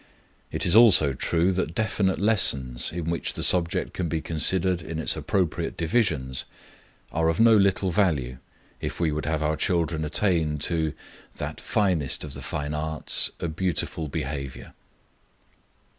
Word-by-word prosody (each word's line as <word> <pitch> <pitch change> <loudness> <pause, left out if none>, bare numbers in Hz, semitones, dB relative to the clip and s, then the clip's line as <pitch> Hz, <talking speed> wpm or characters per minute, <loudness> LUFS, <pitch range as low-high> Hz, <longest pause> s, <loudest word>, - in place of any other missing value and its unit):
It - - -1
is 85 - +5
also 100 - +6
true 85 +7 +1
that 90 -3 -2
definite 100 -3 0
lessons, 70 - +3
in 85 0 -3
which 85 - -3
the - - -1
subject 85 -2 +2
can 90 -3 -3
be 80 - -1
considered 90 +3 +1
in 80 -1 -6
its 80 - 0
appropriate 90 -5 -2
divisions, 80 - 0 0.7
are 80 +1 +1
of 80 - -1
no 115 0 +6
little 100 -2 +2
value 75 -10 0 0.4
if - - -5
we 85 -3 +1
would 75 -1 -3
have 80 -1 -1
our 75 +1 0
children 85 -1 -1
attain 80 -1 0
to 80 +1 -1 0.4
"that - - -6
finest 90 -10 0
of 75 -3 -8
the - - -8
fine 75 0 -4
arts, 80 +1 -1
a - - -2
beautiful 85 -1 -3
behavior." 70 -2 -6
80 Hz, 150 wpm, -25 LUFS, 75-95 Hz, 0.7 s, also